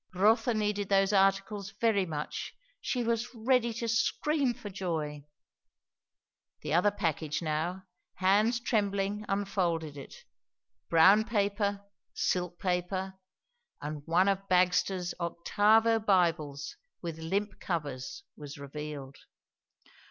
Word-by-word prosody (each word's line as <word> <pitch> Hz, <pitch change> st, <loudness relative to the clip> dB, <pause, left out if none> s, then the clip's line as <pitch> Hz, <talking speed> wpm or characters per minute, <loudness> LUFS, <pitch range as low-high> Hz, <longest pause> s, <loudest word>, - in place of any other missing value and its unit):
Rotha 220 Hz, +5 st, +3 dB
needed 210 Hz, -2 st, -1 dB
those 195 Hz, 0 st, +3 dB
articles 195 Hz, 0 st, +1 dB
very 210 Hz, -5 st, +2 dB
much; 150 Hz, -2 st, -5 dB, 0.2 s
she 250 Hz, -, -1 dB
was 235 Hz, +1 st, -1 dB
ready 235 Hz, +1 st, +2 dB
to 235 Hz, 0 st, -3 dB
scream 255 Hz, +3 st, +1 dB
for 205 Hz, -, -8 dB
joy. 155 Hz, -6 st, -3 dB, 1.4 s
The -, -, -2 dB
other 180 Hz, +5 st, +4 dB
package 165 Hz, -5 st, -2 dB
now; 165 Hz, +4 st, -2 dB, 0.3 s
hands 210 Hz, +5 st, +3 dB
trembling 205 Hz, -3 st, 0 dB
unfolded 180 Hz, -7 st, -1 dB
it. 140 Hz, -, -11 dB, 0.7 s
Brown 190 Hz, +6 st, +6 dB
paper, 200 Hz, -2 st, -1 dB, 0.3 s
silk 180 Hz, -1 st, -1 dB
paper, 185 Hz, +1 st, -1 dB, 0.7 s
and 150 Hz, 0 st, -5 dB
one 175 Hz, +4 st, +3 dB
of 195 Hz, 0 st, 0 dB
Bagster's 180 Hz, 0 st, +2 dB
octavo 215 Hz, +6 st, +3 dB
Bibles 165 Hz, -8 st, 0 dB, 0.3 s
with 165 Hz, -2 st, -5 dB
limp 195 Hz, +5 st, -2 dB
covers 150 Hz, -, -4 dB
was 145 Hz, -1 st, -9 dB
revealed. 140 Hz, -1 st, -7 dB
195 Hz, 105 wpm, -30 LUFS, 165-210 Hz, 1.4 s, Brown